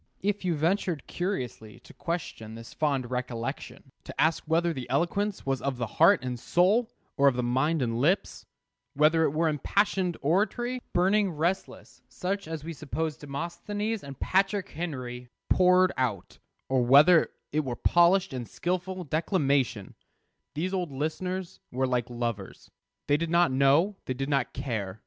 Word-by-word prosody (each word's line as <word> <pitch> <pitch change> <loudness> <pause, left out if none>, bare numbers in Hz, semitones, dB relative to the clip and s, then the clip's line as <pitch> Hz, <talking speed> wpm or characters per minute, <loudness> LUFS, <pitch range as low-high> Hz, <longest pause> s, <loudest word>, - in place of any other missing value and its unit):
If 205 0 0
you 175 -3 0
ventured 170 0 0
curiously 125 - -4
to - - -16
question 140 -10 -5
this 115 0 -10
fond 135 -5 -1
recollection, 125 +1 -5
to - - -10
ask 160 +1 +2
whether 165 +1 +2
the 130 -5 -7
eloquence 185 +9 0
was 135 -1 -1
of 140 -2 -2
the 120 - -1
heart 165 - +4
and 125 -1 -4
soul, 205 - +2 0.3
or 140 - +5
of 135 - +4
the 125 - -1
mind 135 +5 +1
and 115 -1 -1
lips; 175 +8 0 0.5
whether 155 +3 +4
it - - +2
were 160 +3 +1
impassioned 180 +4 0
oratory, 220 - 0
burning, 195 +3 +3
resistless, 170 +4 -3
such 195 0 -3
as 160 -2 -5
we 165 +1 -5
suppose 155 +1 -3
Demosthenes 195 +10 -4
and 140 -2 -9
Patrick 195 0 +1
Henry 125 -7 -5 0.2
poured 185 0 +5
out; 115 -8 -2 0.3
or 130 -2 +2
whether 150 +7 +6 0.2
it 155 - +1
were 125 -3 -3
polished 175 +3 +3
and 125 -3 -5
skilful 185 +1 -3
declamation 145 - 0 0.6
those 180 +5 -2
old 180 -5 -2
listeners 175 +6 -3
were 130 +1 0
like 125 -2 -1
lovers. 120 -5 -5 0.3
They 145 - +3
did 165 +1 -2
not 170 -3 +3
know; 140 +9 +3
they 130 - -3
did 135 +2 -3
not 135 -4 +1
care. 110 -7 -4
155 Hz, 155 wpm, -28 LUFS, 130-180 Hz, 0.6 s, whether